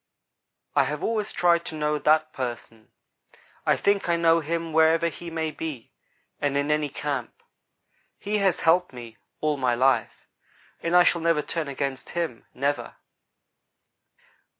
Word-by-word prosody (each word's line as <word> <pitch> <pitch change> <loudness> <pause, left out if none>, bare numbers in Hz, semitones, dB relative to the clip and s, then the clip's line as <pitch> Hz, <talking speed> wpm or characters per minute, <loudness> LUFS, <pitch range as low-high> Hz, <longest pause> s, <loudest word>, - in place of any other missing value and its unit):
I - - +4
have - - -4
always 215 -2 -1
tried 170 -1 +3
to 160 - -6
know 150 0 0
that 155 +2 +2
'person.' 120 -3 -6 0.8
I - - +4
think 200 -3 +1
I 170 - +3
know 165 0 +4
him 165 +1 -3
wherever 160 +1 +4
he 170 +1 -9
may 160 -1 -2
be, 150 -6 -6 0.5
and 140 -1 0
in 145 +1 0
any 150 -1 +1
camp. 140 -3 -5 0.7
He 210 +1 -2
has 195 -3 +1
helped 170 -2 +3
me 120 -2 -10 0.2
all 150 -1 +1
my 125 -3 +1
life, 130 +2 +1 0.6
and 170 +1 0
I 180 - +8
shall 170 -1 +2
never 165 -2 +2
turn 165 -3 -3
against 140 -1 -4
him 165 -9 -3
never." 140 +3 -2
155 Hz, 150 wpm, -25 LUFS, 140-170 Hz, 0.8 s, I